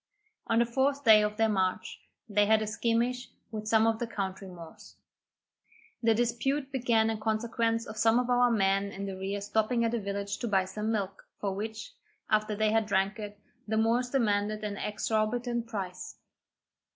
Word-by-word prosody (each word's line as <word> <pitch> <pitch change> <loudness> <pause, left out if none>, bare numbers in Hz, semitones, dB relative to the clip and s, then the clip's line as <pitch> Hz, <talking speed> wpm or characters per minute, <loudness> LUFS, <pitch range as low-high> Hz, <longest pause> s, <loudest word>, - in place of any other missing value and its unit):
On 225 - +2
the 235 - +4
fourth 270 +4 0
day 220 -3 +8
of 210 0 -1
their 225 0 +3
march, 190 -1 -1 0.3
they 205 -1 +2
had 220 0 +4
a - - -2
skirmish 235 +3 -1 0.2
with 215 -1 -5
some 220 0 +4
of 225 -1 +1
the 240 - -2
country 195 -3 -4
Moors. 170 -3 -12 1.1
The 225 -2 +3
dispute 250 +4 -1
began 235 -4 +2
in 220 - -4
consequence 230 +1 0
of 215 - -9
some 225 +1 +4
of 250 0 +1
our 245 0 +4
men 195 -3 +2
in 195 0 -6
the 195 -1 -5
rear 195 +2 -3
stopping 220 +3 +1
at 230 - -1
a 235 - 0
village 200 0 -4
to 240 - -3
buy 195 -3 +2
some 210 +3 -3
milk, 195 -3 -3
for 200 -2 -2
which, 220 - -6 0.4
after 215 0 +2
they 215 0 +1
had 220 -1 +2
drank 195 +1 0
it, 205 -1 -7 0.3
the 220 +1 0
Moors 235 +3 +2
demanded 215 -4 0
an 205 -1 -3
exorbitant 230 +3 -1
price. 195 -5 -6
220 Hz, 180 wpm, -29 LUFS, 205-235 Hz, 1.1 s, day